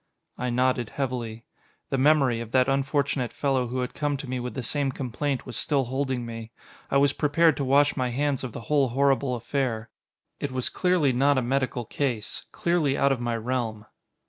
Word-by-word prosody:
I 125 0 -2
nodded 125 -1 +1
heavily. 120 -4 -4 0.5
The 135 - +1
memory, 135 -4 +4
of 115 -2 -6
that 130 -1 +4
unfortunate 135 -1 0
fellow 135 -3 0
who 125 +2 -2
had 125 - -3
come 145 -1 -1
to 135 0 -7
me 130 0 -2
with 125 0 -5
the 130 - -3
same 140 +3 0
complaint 135 +1 -3
was - - -7
still 140 -3 +1
holding 130 -1 -2
me. 115 -1 -7 0.4
I 140 - +3
was 140 0 +4
prepared 155 +2 +3
to 140 - -1
wash 140 +2 +4
my 130 -2 0
hands 140 +2 0
of 130 - -4
the - - -7
whole 140 +2 +2
horrible 135 +1 +2
affair. 120 -2 -2 0.5
It 140 - -3
was 130 -1 -1
clearly 180 -7 +2
not 140 +3 +3
a 130 - +2
medical 130 -1 -1
case, 120 -4 -3
clearly 165 -5 +1
out 140 - +3
of 130 -3 0
my 120 -1 -1
realm. 115 -2 -2
130 Hz, 195 wpm, -26 LUFS, 120-140 Hz, 0.5 s, memory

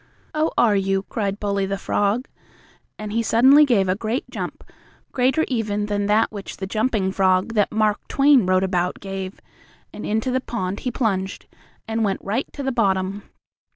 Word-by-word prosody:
"Oh, 310 +1 +1
are 220 -4 +4
you?" 195 0 0
cried 200 -2 -2
Bully, 200 -1 -1
the 195 0 -2
frog, 205 +5 0 0.7
and 210 -1 -6
he 230 +2 +1
suddenly 260 +7 +6
gave 215 -8 +2
a 185 - +2
great 220 +6 -3
jump, - - -6 0.5
greater 265 +5 +2
even 210 -4 -1
than 205 -1 -1
that 215 +2 +3
which 205 -2 -8
the 190 - -4
Jumping 215 -1 0
Frog 190 +2 +2
that 210 -3 +2
Mark 215 -1 0
Twain 275 -7 +4
wrote 185 0 +3
about 180 -2 -1
gave, 195 0 -6 0.5
and 210 - -8
into 220 +4 -1
the 260 +1 0
pond 200 -6 -4
he 255 - -3
plunged, 200 -6 -2 0.4
and 225 0 -1
went 195 -2 0
right 225 +7 -2
to 280 - -6
the 270 - 0
bottom. 195 -3 -1
210 Hz, 175 wpm, -22 LUFS, 195-235 Hz, 0.7 s, suddenly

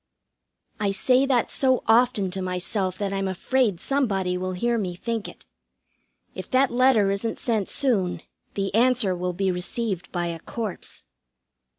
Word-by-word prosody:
I 205 -1 +1
say 255 +7 +3
that 250 -4 +1
so 260 -2 +2
often 225 -4 +3
to 190 +1 -3
myself 185 +1 -2
that 200 -1 -2
I'm 195 0 -1
afraid 205 +1 0
somebody 195 -10 0
will 185 +1 -3
hear 235 +5 0
me 180 -4 -3
think 225 +3 -3
it. - - -13 0.9
If - - -7
that 260 0 +3
letter 240 -5 +4
isn't 200 +3 -2
sent 220 -5 -1
soon, 205 -10 0 0.3
the 195 -1 -2
answer 230 -4 +3
will 180 0 -2
be 190 +1 0
received 190 +1 -3
by 175 -1 -1
a 170 -1 -4
corpse. 215 +2 -6
200 Hz, 155 wpm, -25 LUFS, 185-240 Hz, 0.9 s, letter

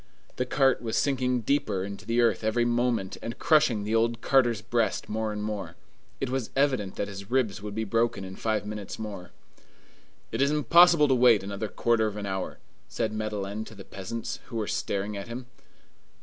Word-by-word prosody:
The 125 - -1
cart 135 -4 +3
was 115 -2 -2
sinking 125 -3 +1
deeper 110 -6 0
into 100 0 -7
the 115 +1 +2
earth 115 -1 +2
every 115 +2 +2
moment, 120 -5 0
and 115 - -5
crushing 150 -10 +3
the 105 +2 -2
old 115 +1 +2
carter's 120 -5 +2
breast 115 0 0
more 110 0 -2
and 105 0 -4
more. 105 -2 -4 0.4
It 135 -2 -2
was 130 -3 -2
evident 130 -9 +1
that 100 - -2
his 100 0 -8
ribs 120 -5 0
would 105 -1 -6
be 110 - -1
broken 115 0 0
in 95 0 -8
five 110 -1 -1
minutes 105 -2 -6
more. 100 -5 -7 1.0
"It - - -1
is 140 - +4
impossible 165 +1 +6
to 135 - +3
wait 120 -5 +5
another 100 +2 -4
quarter 115 0 +1
of 105 -1 -5
an 105 - -4
hour," 95 -1 -3 0.3
said 110 -1 -2
Madeleine 105 -1 -3
to 110 - -12
the 95 - -11
peasants, 100 +4 -5
who 120 - -9
were 110 -2 -1
staring 100 +1 -2
at 100 +2 -6
him. 120 +2 -6
110 Hz, 190 wpm, -27 LUFS, 105-125 Hz, 1.0 s, impossible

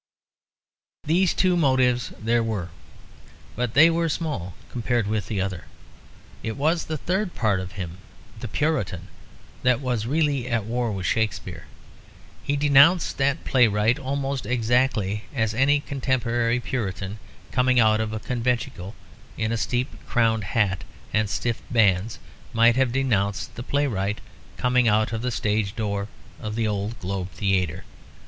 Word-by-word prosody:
These 175 +4 +2
two 185 -1 +3
motives 130 -6 +2
there 115 +2 +2
were, 105 -6 -2 0.9
but 120 0 -2
they 155 +4 +8
were 165 0 +1
small 145 - -3 0.2
compared 120 -1 0
with 105 -2 -2
the 105 - -2
other. 95 -3 -3 0.8
It 110 +2 -4
was 160 +4 +1
the 155 - -3
third 185 +5 -2
part 105 -5 +1
of 95 +1 -6
him, 90 -3 -6 0.4
the - - -5
Puritan, 105 - -1 0.5
that 125 -1 +3
was 125 -5 -2
really 145 -3 +1
at 115 -4 0
war 120 0 -1
with 95 -3 -4
Shakespeare. 110 +3 -2 0.7
He 145 - -1
denounced 145 +5 +5
that 140 +3 +1
playwright 115 0 +3
almost 135 0 -3
exactly 115 -4 +1
as 110 -3 +1
any 140 +5 +3
contemporary 120 -4 0
Puritan 105 -4 -4 0.3
coming 125 0 +3
out 110 -1 +4
of 110 -1 -2
a 110 - -3
conventicle 115 -5 -2 0.4
in 110 0 -1
a - - +1
steeple 120 +2 -2
crowned 110 -3 +2
hat 95 -5 +1 0.3
and 105 -1 +2
stiff 115 +3 -2
bands 105 -2 +2 0.4
might 115 +1 +5
have 130 -2 +2
denounced 110 -7 0
the - - -7
playwright 120 -8 -1 0.4
coming 125 -1 +2
out 110 +1 +2
of 110 - -2
the 125 - -1
stage 105 -3 -1
door 100 -2 -2 0.3
of 105 0 -5
the 115 -1 0
old 105 +2 -2
Globe 95 0 -3
Theatre. 95 -4 -1
115 Hz, 145 wpm, -24 LUFS, 105-130 Hz, 0.9 s, they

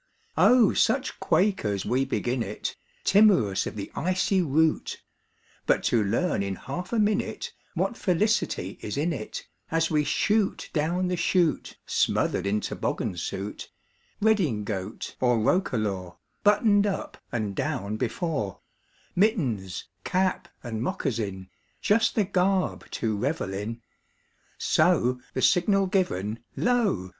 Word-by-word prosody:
Oh, 250 -2 +6
such - - +1
quakers 145 - +1
we 130 +2 +1
begin 125 -2 -1
it, 105 -1 -4 0.3
Timorous 185 - +4
of - - -6
the 100 - -6
icy 185 +1 +1
route! 160 0 +1 0.7
But - - +3
to 115 -3 +4
learn 115 - 0
in 100 -1 -2
half 180 - -6
a 235 - 0
minute 210 -1 0 0.2
What 190 +6 0
felicity 185 - 0
is 105 - -4
in 165 +4 +1
it, 110 -7 -6 0.2
As 165 0 +1
we 150 -1 +3
shoot 210 +6 0
down 170 +4 0
the 180 - 0
chute, 170 -1 +1
Smothered 95 - +1
in 105 +1 +1
toboggan - - -2
suit, 95 +3 -5 0.5
Redingote 110 - -1
or 125 -2 +3
roquelaure, 110 - 0 0.3
Buttoned 205 0 +4
up 195 - -4
(and 110 -6 -2
down) 100 +3 -2
before, 120 - -2 0.6
Mittens, 135 - +1 0.2
cap, 185 0 0 0.2
and 115 -3 -4
moccasin, 110 - -2 0.3
Just 220 +1 +2
the 215 - +3
garb 190 0 0
to 110 -2 -1
revel 125 -3 -2
in; 110 +4 -5 0.7
So, 125 +1 +2 0.2
the 130 - 0
signal 195 +2 +4
given, 115 - -1 0.2
lo! 220 - +1
150 Hz, 125 wpm, -26 LUFS, -, 0.7 s, Oh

